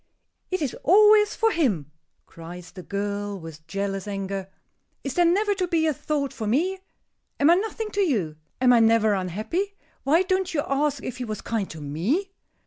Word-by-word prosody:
"It 370 -4 -1
is 270 - -2
always 420 +4 +6
for 450 0 +2
him!" 200 - 0 0.3
cries 170 +1 -10
the 185 - -9
girl, 200 +1 -3
with 160 -1 -11
jealous 195 +1 -3
anger. 195 -1 -4 0.5
"Is 275 - -3
there 350 +3 +3
never 405 +5 +3
to 375 -2 -1
be 330 -2 +1
a 310 - +2
thought 280 0 -2
for 220 - -4
me? 350 - +1 0.6
Am 290 +3 +6
I - - +8
nothing 430 +3 -2
to 405 - 0
you? 210 - 0 0.2
Am 250 -1 +5
I 240 - +6
never 225 -1 +4
unhappy? 215 - -2 0.3
Why 320 +6 +3
don't 370 -1 -1
you 290 - +1
ask 285 +1 0
if 250 - -5
he 250 - -4
was 215 -2 -5
kind 220 -4 -2
to 155 - -8
me?" 205 - -1
255 Hz, 185 wpm, -25 LUFS, -, 0.6 s, I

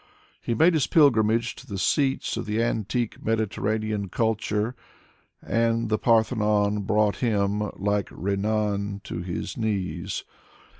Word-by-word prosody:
He 115 - -1
made 165 +6 +5
his. 155 -4 +2
pilgrimage 115 -6 +3
to - - -12
the 100 - -5
seats 135 +7 +1
of - - -4
the 105 +1 -1
antique 115 0 -2
Mediterranean 110 -1 -1
culture, 110 +2 -1 0.7
and 115 0 +1
the 110 - +1
Parthenon 105 -3 +2
brought 105 -1 +2
him, 105 -3 0
like 100 0 0
Renan, 100 0 -1
to 85 - -5
his 90 0 -5
knees. 100 -4 -2
110 Hz, 120 wpm, -25 LUFS, 100-115 Hz, 0.7 s, made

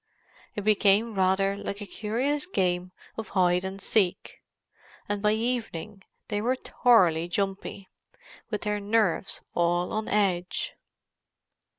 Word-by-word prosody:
It 205 - -3
became 215 +2 +3
rather 195 0 +2
like 200 0 -5
a 205 - -5
curious 255 - -1
game 180 - 0 0.3
of 225 - -5
hide 180 0 +3
and 190 +1 -5
seek, 195 -2 0 0.7
and 205 -1 -2
by 210 0 +3
evening 220 -4 -3 0.3
they 205 -2 -1
were 250 +4 +1
thoroughly 180 -11 +3
"jumpy," 195 +1 -3 0.6
with 210 -3 -3
their 210 -1 -1
nerves 205 -3 +1
all 175 +1 +1
on 215 0 -2
edge. 195 - 0
200 Hz, 120 wpm, -27 LUFS, 185-220 Hz, 0.7 s, became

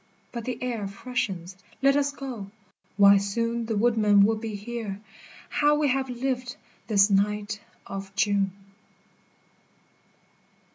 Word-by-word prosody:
— - - -37
But 235 -2 -5
the 255 - -3
air 230 -5 -2
freshens, 195 -4 -4 0.3
let 275 0 +5
us 285 0 +2
go, 250 -8 -7 0.5
why 200 0 +8
soon 230 +4 -1
The 225 -2 -1
woodmen 210 -3 +4
will 220 +2 +2
be 220 -1 -5
here; 210 -1 -5 0.5
how 295 0 +3
we 295 -1 +2
have 265 0 0
lived 250 0 -2 0.3
this 200 -1 +5
night 210 +2 +1 0.2
of 195 0 -6
June 200 -3 +2
220 Hz, 130 wpm, -26 LUFS, 200-250 Hz, 0.5 s, why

